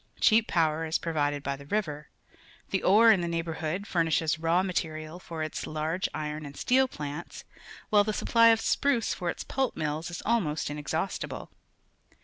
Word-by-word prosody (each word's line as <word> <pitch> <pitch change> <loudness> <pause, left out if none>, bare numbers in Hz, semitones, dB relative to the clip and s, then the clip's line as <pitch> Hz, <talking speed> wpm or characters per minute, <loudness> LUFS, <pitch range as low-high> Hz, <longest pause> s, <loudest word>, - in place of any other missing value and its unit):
Cheap 220 0 +4
power 160 -2 +1
is 160 - +1
provided 145 -3 -1
by 140 0 -2
the 140 +1 -13
river. 150 -7 -2 0.6
The 190 - +1
ore 225 +4 +6
in 200 -5 +3
the 170 - -2
neighbourhood 165 +2 -3
furnishes 165 -4 +1
raw 165 +3 +2
material 160 -2 -3
for 165 -3 -5
its 155 - -4
large 155 +4 -2
iron 150 0 -4
and 140 -1 -9
steel 260 +1 +3
plants, 150 - -7 0.5
while 205 -1 +6
the 215 - -1
supply 230 +2 +4
of 225 -1 +5
spruce 240 +1 +1
for 175 -2 -3
its - - -4
pulp 265 -1 -2
mills 155 +2 -2
is 170 - -6
almost 170 -11 0
inexhaustible. 160 +5 -4
165 Hz, 165 wpm, -28 LUFS, 155-205 Hz, 0.6 s, ore